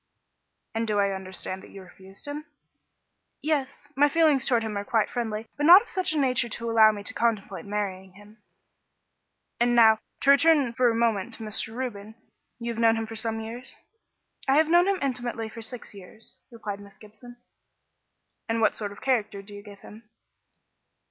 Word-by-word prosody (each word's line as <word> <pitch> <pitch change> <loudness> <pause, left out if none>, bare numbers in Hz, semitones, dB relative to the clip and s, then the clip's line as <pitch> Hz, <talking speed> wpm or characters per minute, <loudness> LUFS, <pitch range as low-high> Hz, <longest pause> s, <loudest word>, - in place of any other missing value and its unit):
"And 225 0 -2
do 210 -1 0
I 200 -1 +2
understand 190 0 -5
that - - -14
you 195 - -11
refused 190 +1 -12
him?" 295 +1 -6 0.9
"Yes. 290 -2 -2
My 290 +2 +4
feelings 305 -4 +3
towards 235 -4 +2
him 215 -1 -4
are 200 - -2
quite 220 +1 0
friendly, 225 -3 -3
but 295 +1 +1
not 365 +5 +10
of - - -18
such 370 -3 -1
a - - -1
nature 255 -4 +1
as - - -8
to 230 0 -4
allow 220 -1 +7
me 205 -1 -7
to 250 - -4
contemplate 230 -5 -1
marrying 195 -2 -4
him." 210 +2 -18 1.2
"And 240 0 +2
now, 220 -2 +6 0.2
to 275 - +5
return 280 -4 +4
for 245 +1 +3
a 230 - 0
moment 225 -5 0
to 225 - -9
Mr. 220 +1 -4
Reuben. 220 -4 -6 0.4
You 235 -1 -4
have 230 - -4
known 225 0 +5
him 225 0 -2
for 225 +1 -9
some 225 0 -2
years?" 235 +4 -8 0.7
"I 270 - +4
have 310 +1 +4
known 350 +2 +5
him 395 -1 +2
intimately 240 -4 -2
for 230 +1 -10
six 225 +1 -8
years," 200 +3 -14 0.2
replied 215 -4 -6
Miss 200 -1 -14
Gibson. 220 +3 -15 1.1
"And 225 0 0
what 220 - +2
sort 205 -2 -4
of 205 - -13
character 215 -6 -1
do 205 +1 -13
you 205 - -9
give 205 -1 -14
him?" 215 +1 -14
225 Hz, 190 wpm, -26 LUFS, 210-255 Hz, 1.2 s, not